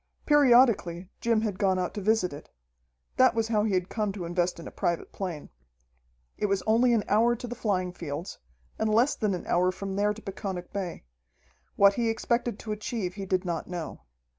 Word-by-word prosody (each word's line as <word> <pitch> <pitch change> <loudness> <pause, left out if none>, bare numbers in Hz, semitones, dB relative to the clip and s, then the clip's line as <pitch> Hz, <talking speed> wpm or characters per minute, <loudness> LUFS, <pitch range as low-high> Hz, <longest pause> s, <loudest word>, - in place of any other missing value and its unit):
Periodically, 240 - +4
Jim 230 -2 +2
had 205 -4 -3
gone 190 -2 +2
out 180 -1 -2
to 210 - -4
visit 205 -4 +1
it. 145 - -10 0.7
That 255 -2 +5
was 225 -1 0
how 210 -2 +2
he 205 -3 +1
had 180 -1 0
come 210 -2 -1
to 190 -4 -5
invest 175 0 -1
in 165 - -8
a - - -8
private 170 -1 -2
plane. 175 -6 -5 0.9
It 210 - +1
was 195 -1 0
only 235 +3 +3
an 220 -3 +2
hour 230 +3 +3
to 245 - -7
the 245 - -5
flying 185 -6 -1
fields, 165 0 -6 0.4
and 220 0 +1
less 240 +6 +4
than 210 -3 -1
an 175 - -7
hour 180 +1 +2
from 195 +1 -5
there 205 +1 +2
to 215 +1 -7
Peconic 190 -2 -5
Bay. 190 -4 -4 0.7
What 200 0 +6
he 230 +1 0
expected 235 0 -1
to 215 - -6
achieve 210 -3 -3
he 195 0 -6
did 185 0 0
not 170 -2 -3
know. 175 -3 -6
200 Hz, 200 wpm, -28 LUFS, 180-225 Hz, 0.9 s, What